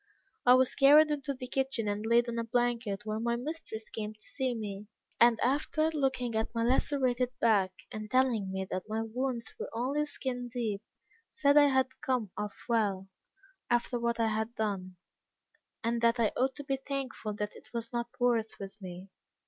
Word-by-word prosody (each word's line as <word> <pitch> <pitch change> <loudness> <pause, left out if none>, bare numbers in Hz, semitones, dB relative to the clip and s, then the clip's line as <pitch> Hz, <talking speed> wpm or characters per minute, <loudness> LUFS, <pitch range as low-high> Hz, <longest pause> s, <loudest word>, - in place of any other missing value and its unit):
I 250 - +9
was 255 0 +3
carried 300 +3 +7
into 280 -1 -2
the 255 - -6
kitchen, 260 -3 -1
and 205 +1 -1
laid 235 +1 +4
on 235 0 -2
a - - 0
blanket, 230 -3 0
where 215 0 -2
my 235 +1 0
mistress 245 -4 -5
came 215 -1 -4
to - - -28
see 255 +3 -2
me; 205 -2 -5 0.3
and 235 -1 +6
after 310 +4 +1
looking 265 -5 0
at 220 +1 -1
my 230 - +1
lacerated 255 0 +2
back, 205 -5 +3 0.2
and 215 0 -6
telling 240 -6 +2
me 190 0 -2
that 185 +3 -3
my 220 +1 -1
wounds 235 0 -3
were - - -4
only 270 +6 0
skin 250 -4 -4
deep, 225 -5 -2 0.5
said 285 -2 +3
I 290 -1 +8
had 265 -1 +1
come 245 -7 -1
off 210 0 -4
well, 200 -5 +1 0.6
after 240 0 +1
what 235 0 0
I 225 -1 +3
had 220 +2 -2
done, 190 -4 -2 0.9
and 230 +1 0
that 235 +1 +3
I 225 -2 +3
ought 260 +1 +1
to 290 - -7
be 275 -1 -1
thankful 265 -5 -4
that 210 0 -4
it - - -15
was 230 0 -5
not 235 0 -1
worse 235 -3 +2
with 195 +1 -8
me. 185 0 -8
235 Hz, 185 wpm, -31 LUFS, 215-260 Hz, 0.9 s, I